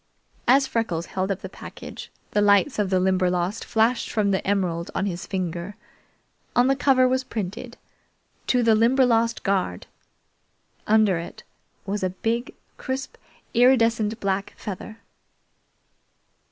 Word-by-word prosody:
As 270 +3 +5
Freckles 225 -10 -2
held 190 +2 -3
up 195 0 -2
the - - -6
package, 190 - -10 0.2
the 210 - +2
lights 205 +5 +3
of 205 -2 +1
the 185 -1 +2
Limberlost 185 +1 0
flashed 225 +2 +1
from 205 -2 +1
the 190 - 0
emerald 180 -4 0
on 195 - 0
his 175 -3 -4
finger. 180 0 -4 0.8
On 245 - +5
the 270 +1 +3
cover 260 -2 +4
was 260 +1 +1
printed: 225 +1 -6 0.7
"To 250 -1 +3
the 225 -1 +5
Limberlost 230 0 +3
Guard!" 195 -2 -1 1.0
Under 215 -5 +4
it 170 - -9 0.4
was 200 +1 -2
a 185 - 0
big, 225 +6 -3 0.2
crisp, 265 0 -4 0.4
iridescent 230 -3 +3
black 195 -1 -2
feather. 215 +3 -7
210 Hz, 130 wpm, -24 LUFS, 190-235 Hz, 1.0 s, As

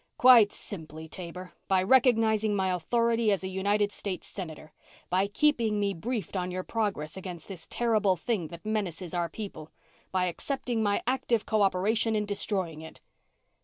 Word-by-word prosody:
"Quite 240 -5 +8
simply, 160 -4 -5
Taber. 180 +2 -8
By 190 -1 +3
recognizing 220 -3 +4
my 190 -2 +1
authority 230 +5 +1
as 195 -1 0
a - - -2
United 200 +2 +1
States 195 -2 -4
Senator. 160 -5 -8 0.4
By 190 +2 +2
keeping 225 -2 +2
me 200 -1 +1
briefed 210 +1 -4
on 180 -1 -1
your 185 0 -3
progress 195 -10 -2
against 180 -3 -7
this 190 -4 -8
terrible 215 -5 +2
thing 180 -1 -2
that 170 +4 -11
menaces 190 -5 -3
our 175 -1 0
people. 190 -5 -7 0.4
By 185 -1 +1
accepting 235 - -2
my 205 -1 +1
active 245 -3 0
co 215 -1 +1
operation 210 +4 +2
in 210 -1 0
destroying 195 -6 -2
it." 160 - -11
200 Hz, 160 wpm, -28 LUFS, 180-220 Hz, 0.4 s, Quite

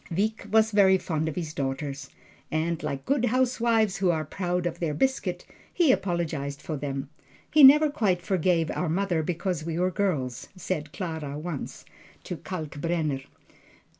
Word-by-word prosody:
Wieck 205 +4 -1
was 220 +1 +4
very 195 -2 +5
fond 160 -3 -2
of 155 - -6
his 160 -4 -4
daughters, 140 0 -4 0.4
and 160 +1 -1
like 135 -1 -4
good 270 -3 +2
housewives 235 -4 +2
who 195 -2 +2
are 160 -2 0
proud 180 +2 -2
of 170 0 -3
their 155 -4 -1
biscuit, 265 - -1 0.3
he 330 -6 +4
apologized 165 - -1
for 155 - -5
them. 140 -1 -4 0.4
"He 305 -1 +6
never 295 +3 +8
quite 205 -11 +1
forgave 175 -3 +1
our 180 - -2
mother 175 -1 0
because 175 0 -2
we 165 0 -3
were 180 +1 +1
girls," 140 -10 -2
said 155 -4 -4
Clara 160 -6 -4
once, 155 -2 -6 0.4
to 180 - -5
Kalkbrenner. 155 -3 -3
175 Hz, 155 wpm, -27 LUFS, 155-200 Hz, 0.4 s, never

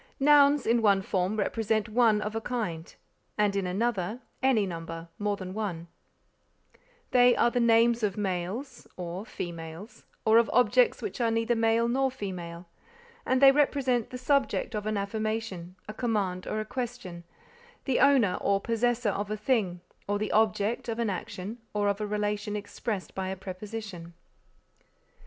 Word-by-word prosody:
Nouns, 285 0 +5
in 230 +1 +3
one 200 -3 +3
form, 190 +2 -1
represent 215 +1 0
one 220 -1 +3
of 210 +1 -4
a 225 - -1
kind, 185 -10 -4 0.4
and 205 -1 +2
in 195 -2 0
another, 210 +2 -1 0.2
any 260 -6 +3
number 165 -1 -6
more 205 -1 0
than 185 -1 -7
one; 180 -6 -4 1.2
they 245 -1 +6
are 240 - +3
the 245 - 0
names 235 0 +4
of 205 -2 -1
males, 205 +7 -4
or 180 +4 -5
females, 170 +4 -8 0.2
or 220 +1 +6
of 235 - +1
objects 455 - +3
which 390 -11 -4
are 230 - +3
neither 230 +1 +1
male 225 +1 +2
nor 265 +3 +1
female; 180 -8 -6 0.6
and 260 +1 +2
they 270 - +10
represent 270 -4 +1
the 250 - -6
subject 265 -2 0
of 210 -1 -3
an 215 -1 0
affirmation, 200 -3 -3
a 215 - -6
command 205 -6 -1
or 215 - -2
a 215 - -3
question, 230 -8 -5 0.6
the 265 -3 +1
owner 260 -10 +4
or 200 0 +2
possessor 230 +1 0
of 205 +1 -3
a 215 - -2
thing, 205 -6 0 0.3
or 205 0 0
the 210 0 -2
object 215 +1 +1
of 225 - -2
an 230 -3 0
action, 190 +4 -6 0.2
or 205 -1 +1
of 200 +1 0
a 210 - -2
relation 210 0 -2
expressed 205 -1 -4
by 190 -1 -3
a 190 - -3
preposition. 185 -2 -7
215 Hz, 160 wpm, -28 LUFS, 190-235 Hz, 1.2 s, they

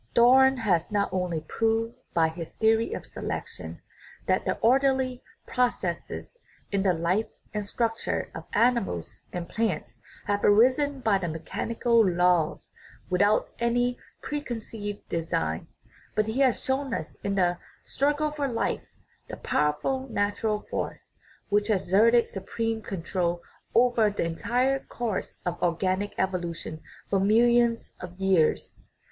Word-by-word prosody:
Darwin 265 +3 +6
has 185 -8 +1
not 205 -1 +1
only 180 -4 -1
proved 225 +7 0 0.2
by 165 -1 +3
his 160 0 -7
theory 225 +1 +2
of - - -5
selection - - -6 0.5
that - - +1
the - - 0
orderly 260 +1 +2 0.2
processes 245 - -2 0.3
in 200 -1 +1
the 190 -1 +3
life 180 +6 0 0.3
and 210 -1 -2
structure 230 +1 -1
of - - -7
animals 230 - +1
and 175 -1 -4
plants 155 - -2 0.2
have 205 0 0
arisen 260 +6 +4
by 215 -4 +3
mechanical 225 +7 +1
laws 175 -3 +2 0.4
without 205 +4 +3
any 245 +1 +1 0.3
preconceived 225 -7 -5
design, 80 - -2 0.5
but 215 - +2
he 220 +4 -2
has 265 -2 +3
shown 265 -2 0
us - - -6
in 200 0 -1
the 175 -2 +2 0.2
" - - -36
struggle 295 +2 0
for 290 -2 -2
life 235 -3 -2 0.2
" - - -38
the - - -6
pow 150 - +1
erful 265 - -3
natural 210 0 0
force - - -4 0.4
which 205 0 +2
has 205 -4 +1
exerted 230 +6 +4
supreme 225 +3 -3
control 175 -2 -2 0.3
over 235 -2 +4
the 205 - -2
entire 250 +11 +1
course 235 -7 -4
of 175 -1 -3
organic 185 +3 0
evolution 170 -4 -3 0.3
for 195 - +1
millions 235 +3 +3
of 180 0 -9
years. 190 -5 +1
210 Hz, 135 wpm, -27 LUFS, 180-240 Hz, 0.5 s, Darwin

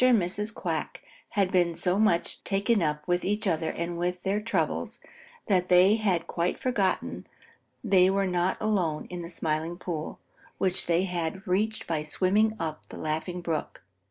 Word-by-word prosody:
and 255 -2 +6
Mrs. 200 +4 0
Quack - - -3 0.3
had 195 -3 +1
been 175 -3 +2
so 180 +3 +2
much 215 -6 +1
taken 205 +2 +1
up 150 -2 -1
with 175 0 +1
each 210 +3 0
other 160 -4 0
and 170 +1 -3
with 180 +1 -2
their 200 +2 0
troubles 165 - -1 0.5
that 185 -2 +2
they 185 +4 +6
had 185 -6 +1
quite 170 +1 -1
forgotten 230 -8 -1 0.6
they 190 -4 +5
were 195 0 +1
not 180 0 0
alone 185 -8 0
in 180 -1 -4
the 170 - -7
Smiling 160 0 -2
Pool, 165 -4 -5 0.4
which 185 -1 0
they 170 +1 +3
had 180 +1 -3
reached 215 +4 0
by 160 -2 -1
swimming 195 +8 +2
up 155 -2 -4
the - - -9
Laughing 160 +3 -3
Brook. 165 -3 -3
180 Hz, 165 wpm, -28 LUFS, 170-200 Hz, 0.6 s, and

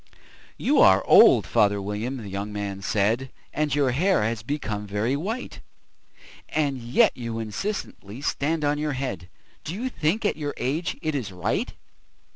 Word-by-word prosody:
"YOU - - +2
are - - +6
old, - - +7
father 100 -1 +2
William," 105 +6 -3
the 110 -5 -8
young 100 +2 -4
man 100 -1 -4
said, 110 +6 0 0.2
"And 150 -2 0
your 140 -3 +2
hair 180 - +2
has 110 0 -1
become 110 -5 -4
very 105 +6 0
white; 215 - -4 0.9
And 140 -4 0
yet 120 +1 +3
you 115 -2 -5
incessantly 110 - -5
stand 150 +2 -1
on 145 0 +1
your 150 -1 -1
head 125 -11 -4 0.3
Do 165 - -5
you 250 +5 -3
think, 205 +1 -1
at 205 - +1
your 145 -2 -4
age, 155 +7 -2
it 155 -1 -1
is 125 -9 -3
right? 90 -1 -2
130 Hz, 160 wpm, -25 LUFS, 105-150 Hz, 0.9 s, old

